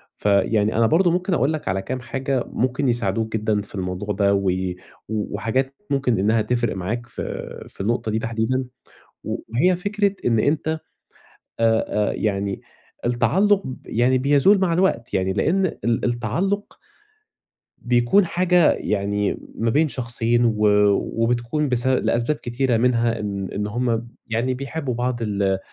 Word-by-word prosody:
فيعني 105 +1 +2
أنا 115 0 +4
برضه 175 +6 +3
مُمكن 180 +2 0
أقول 155 -2 +2
لك 155 - -5
على 95 +1 0
كام 130 +6 -4
حاجة 135 0 -2
مُمكن 130 +2 0
يساعدوك 110 -1 0
جدًا 105 -1 0
في 100 - -11
الموضوع 95 +2 -3
ده، 100 0 +3
وي 95 -2 0 0.3
وحاجات 115 +5 -2
مُمكن 135 -6 +1
إنّها 110 +3 +2
تِفرق 120 -1 0
معاك 110 +7 -3
ف 120 - -7 0.5
فالنُقطة 110 +2 -2
دي 110 - 0
تحديدًا، 115 +3 -1 0.6
و - - -3
وهي 165 +11 +3
فِكرة 200 +2 0
إن 115 -2 +3
أنت 150 +7 +1 0.9
آآ، 115 -1 +3 0.3
آآ - - -4
يعني 100 -2 -2 0.4
التعلُق 190 +12 +2
ب 130 - -6
يعني 125 +3 +2
بيزول 145 +9 +4
مع 185 -3 +1
الوقت، 165 -10 0
يعني 95 0 +1
لأن 180 - +2
ال 120 - -1
التعلُق 170 - -1 1.0
بيكون 120 +11 +3
حاجة 180 -1 +3
يعني 100 0 -1 0.2
ما 115 0 0
بين 155 +6 +3
شخصين، 120 -2 +1
و 110 -2 +1 0.6
وبتكون 120 +6 0
بس 125 0 -1
لأسباب 130 +1 +1
كتيرة، 125 -1 -1
منها 115 -1 +1
إن 100 -2 -3
إن 105 +1 -2
هم 120 +2 0
ب 115 +1 -7 0.2
يعني 115 +3 -1
بيحبوا 140 0 -4
بعض 120 0 -2
ل 100 -3 0
120 Hz, 145 wpm, -22 LUFS, 105-135 Hz, 1.0 s, أنا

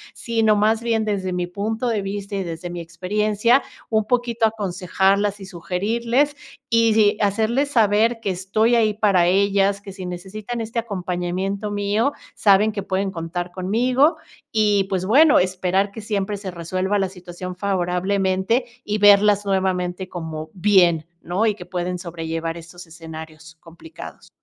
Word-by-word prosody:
Sino, 225 -2 +1
más 215 +2 +2
bien, 225 -2 0
desde 190 -3 -2
mi 180 0 -1
punto 220 +6 -3
de 225 -3 0
vista 200 +1 -5
y 195 - -1
desde 170 0 -6
mi 175 0 -5
experiencia, 210 +8 +1 0.3
un 220 -1 +2
poquito 235 -1 +1
aconsejarlas 200 0 0
y 195 - -9
sugerirles, 230 - -1 0.3
y 230 -1 +4
sí, 210 -2 +4
hacerles 220 +7 +1
saber 225 0 +3
que 205 -3 -2
estoy 195 +6 +1
ahí 220 -2 +3
para 195 -5 +3
ellas, 200 +1 +2
que 200 -1 -10
si 190 -1 -8
necesitan 200 +6 -6
este 225 +1 -3
acompañamiento 190 -1 -3
mío, 205 +6 0 0.2
saben 205 +1 +4
que 205 -1 -4
pueden 195 0 -1
contar 175 +1 -5
conmigo. 245 - +2 0.3
Y, 210 -3 +2
pues, 190 -1 -2
bueno, 285 +9 +6
esperar 185 +2 0
que 220 - -8
siempre 205 -1 -2
se 195 -1 -6
resuelva 185 +4 -2
la 195 -2 0
situación 180 0 -8
favorablemente 190 +4 0 0.2
y 210 0 -2
verlas 205 0 +5
nuevamente 185 -1 -1
como 160 -3 -6
bien, 180 -4 +3 0.2
¿no?, 185 +6 -1
y 215 - +2
que - - -10
pueden 180 0 -3
sobrellevar 165 -1 -4
esos 170 +2 -11
escenarios 160 0 -10
complicados. 170 - -12
195 Hz, 150 wpm, -22 LUFS, 180-215 Hz, 0.3 s, bueno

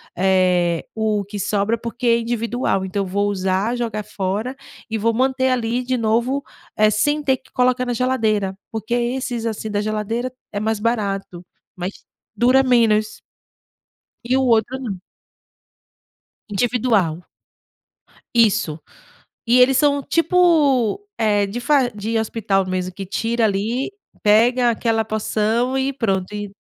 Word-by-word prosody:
eh, 180 -2 +2
o 215 -2 0
que 205 +1 -7
sobra, 205 +3 0
porque 235 +2 -4
é 230 0 +5
individual. 230 -4 -1
Então, 195 +1 -2
vou 200 +2 0
usar, 190 +4 0
jogar 220 -3 -3
fora 210 +5 -3 0.3
e 220 - -1
vou 230 +2 +1
manter 260 +2 +1
ali 245 0 0
de 255 0 -1
novo, 235 +5 +1 0.4
eh, 215 0 +5
sem 290 +9 +1
ter 265 -2 +2
que - - -20
colocar 250 0 +1
na 245 - -2
geladeira. 215 -6 0
Porque 220 +1 -4
esses, 240 -1 -1
assim, 220 -1 -3
da 205 0 -1
geladeira 215 +4 -2 0.2
é 205 - -2
mais 220 -1 -1
barato, 200 -6 -2 0.3
mas 180 +2 -4 0.4
dura 255 +4 +4
menos 220 -4 +2 1.1
e 255 +2 +1
o 265 - +2
outro 240 +1 +2
não. 215 -8 -5 1.5
Individual. 205 -6 +1 1.1
Isso, 215 -8 +3 0.7
e 245 +2 +4
eles 255 +1 +5
são 285 0 +3
tipo, 330 - +2
eh, 205 -2 +2
de 210 +5 -5
far 265 -2 +2
de 220 +2 -3
hospital 210 -3 0
mesmo, 185 0 -3
que 195 +1 -6
tira 225 +4 0
ali, 220 - -1 0.3
pega 240 +4 +4
aquela 225 -1 0
porção 220 +4 0
e 270 +1 0
pronto, 195 -6 -1
e 205 -1 -4
225 Hz, 135 wpm, -20 LUFS, 205-250 Hz, 1.5 s, é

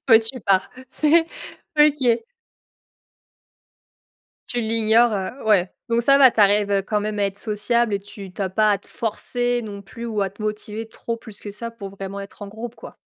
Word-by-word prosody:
Ouais 225 -3 +9
tu 245 +3 -5
pars, 195 -2 +2 0.2
c'est 315 +4 +3 0.5
OK. 280 -6 +4 2.2
Tu 245 - -1
l'ignore, 225 +1 +3
heu 195 +7 -4
ouais. 190 -4 +3 0.2
Donc 235 0 +2
ça 275 +3 +5
va, 265 -2 +8
tu 225 - 0
arrives 200 -1 +4
quand 210 +1 0
même 210 0 -3
à 205 - +2
être 195 0 -3
sociable 220 +1 +1
et 200 - +1
tu 195 -1 -11
tu 200 - -4
as 190 - 0
pas 215 +2 +3
à 200 - +1
te - - -18
forcer 245 +2 -1
non 205 -2 -7
plus 230 +4 -9
ou 215 -3 -2
à 195 - 0
te 200 +3 -11
motiver 215 +1 -4
trop 230 +1 -5
plus 220 -3 -13
que 205 - -7
ça 230 +3 -5
pour 210 -4 -8
vraiment 195 0 -7
être 200 +1 -10
en 200 - -6
groupe, 225 +3 -7
quoi. - - -12
215 Hz, 195 wpm, -22 LUFS, 200-235 Hz, 2.2 s, Ouais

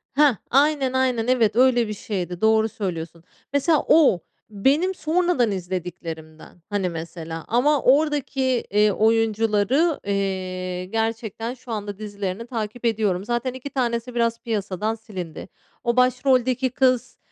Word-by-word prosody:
Heh, 285 -4 +5
aynen, 275 -1 +3
aynen. 255 -3 +1
Evet, 230 -4 +2
öyle 245 -2 +4
bir 210 - -3
şeydi, 180 -4 -4
doğru 220 0 +3
söylüyorsun. 170 -5 -5 0.3
Mesela 295 +2 +2
o, 295 - +5 0.3
benim 280 - +1
sonradan 325 -8 +1
izlediklerimden. 175 -3 -6
Hani, 200 -3 -1
mesela, 165 -1 -7
ama 275 +5 +2
oradaki, 285 0 +2 0.3
eee, 210 +1 +4
oyuncuları, 225 - +2
eee, 185 -2 -2
gerçekten 225 +2 -3
şu 250 -1 -11
anda 205 -2 -4
dizilerini 205 +1 -5
takip 230 0 -5
ediyorum. 205 -5 0
Zaten 240 +2 -1
2 260 +2 -7
tanesi, 240 -2 -2
biraz 230 -1 +1
piyasadan 210 -1 -2
silindi, 185 -8 -8 0.4
o 235 -1 +1
başroldeki 255 0 +2
kız, 255 -1 +1
225 Hz, 125 wpm, -23 LUFS, 195-255 Hz, 0.4 s, Heh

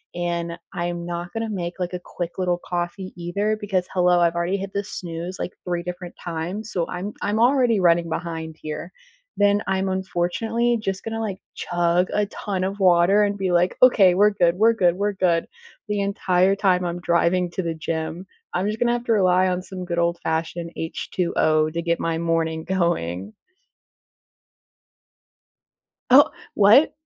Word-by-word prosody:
and 170 -1 -2 0.2
I'm 175 0 -3
not 175 0 -5
gonna 225 0 -3
make, 180 -3 -4
like, 180 0 -3
a 180 - -3
quick 175 0 -6
little 180 -1 0
coffee 175 +2 -4
either 200 +5 -1
because, 190 -3 -1
hello, 180 -1 +4
I've 170 0 +2
already 175 +3 0
hit 195 0 -6
the 200 - -1
snooze, 175 -2 -6
like, - - -4
3 175 -1 -1
different 180 0 -7
times, 180 +6 -4
so 170 -2 0
I'm 185 +4 -5
I'm 210 +2 0
already 245 -3 +4
running 170 -1 +3
behind 160 -1 -4
here. 155 +3 -6 0.5
Then 205 0 +3
I'm 190 0 0
unfortunately 190 +6 0
just 195 -2 -3
gonna, 225 0 -4
like, 200 -3 -3 0.2
chug 175 +1 +1
a 210 0 +2
ton 195 -2 -4
of 195 +2 -3
water 185 +3 +5
and 205 0 0
be 190 -2 -1
like, 175 +1 +2
"Okay, 200 -8 +6
we're 205 +3 +5
good, 175 -4 +2
we're 225 +4 +4
good, 180 -5 +2
we're 205 +1 -1
good," 175 -3 +1 0.4
the 210 -1 -1
entire 195 -1 +2
time 185 -3 +2
I'm 175 0 -3
driving 175 +1 +2
to 190 - -3
the 165 -1 -2
gym. 160 +3 -4 0.3
I'm 185 +3 0
just 215 +1 -3
gonna 240 0 +2
have 240 0 -3
to 230 - +2
rely 185 -2 +3
on 180 0 -1
some 185 -1 -7
good 170 -1 -3
old-fashioned 170 0 -1
H2O 160 -2 0
to 170 +1 -2
get 170 0 0
my 165 -1 -1
morning 165 -1 0
going. 110 - -1 2.8
Oh 280 +3 +7 0.2
what? 215 +9 +6
180 Hz, 170 wpm, -23 LUFS, 170-200 Hz, 2.8 s, Oh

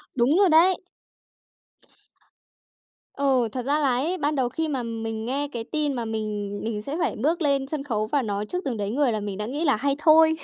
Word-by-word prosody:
Đúng 260 +6 +3
rồi 395 -2 +5
đấy. 340 +4 +6 2.4
Ừ, 265 -4 +2
thật 250 0 -4
ra 290 +3 +2
là 285 -3 +2
ấy, 320 +9 0
ban 300 -1 0
đầu 255 -3 +1
khi 320 +4 -2
mà 270 -5 -2
mình 225 -1 -4
nghe 280 +4 -1
cái 235 -3 -4
tin 295 +3 -1
mà 240 -3 -3
mình 210 -2 -3
mình 220 -2 -3
sẽ 280 +8 -5
phải 340 - 0
bước 330 +4 +1
lên 280 -3 +1
sân 290 -1 -4
khấu 215 -6 -2
và 285 +5 +1
nói 205 -3 -2
trước 360 - -4
từng 245 -4 -2
đấy 200 -1 -2
người 270 +1 +2
là 215 - -1
mình 205 -2 -5
đã 210 - -3
nghĩ 285 +8 -3
là 280 - +4
hay 275 +5 0
thôi. 320 0 +6
270 Hz, 220 wpm, -25 LUFS, 225-300 Hz, 2.4 s, đấy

